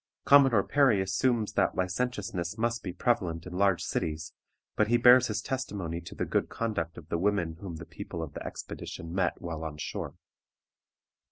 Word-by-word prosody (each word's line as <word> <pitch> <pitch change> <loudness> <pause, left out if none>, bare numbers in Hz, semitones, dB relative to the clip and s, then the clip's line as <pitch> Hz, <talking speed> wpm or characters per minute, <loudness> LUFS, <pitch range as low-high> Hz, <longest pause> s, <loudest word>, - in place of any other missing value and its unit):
Commodore 135 -7 +6
Perry 135 -8 +4
assumes 105 +4 +1
that - - +2
licentiousness 95 -2 -2
must 115 +1 0
be 90 - -4
prevalent 85 -6 0
in 90 - -8
large 95 -1 +2
cities, 80 0 -3 0.4
but 105 - +3
he 120 +2 +4
bears 125 +1 +7
his 105 - -2
testimony 100 -10 -3
to 85 - -10
the - - -1
good - - 0
conduct 95 -8 -3
of 80 - -11
the 85 - 0
women 85 -4 0
whom 95 -4 -6
the 80 0 -8
people 85 0 -6
of 75 -3 -7
the - - -6
expedition 80 0 -7
met 90 -1 0
while 80 -2 -5
on 80 -2 -5
shore. 75 - -5
95 Hz, 175 wpm, -29 LUFS, 85-115 Hz, 0.4 s, bears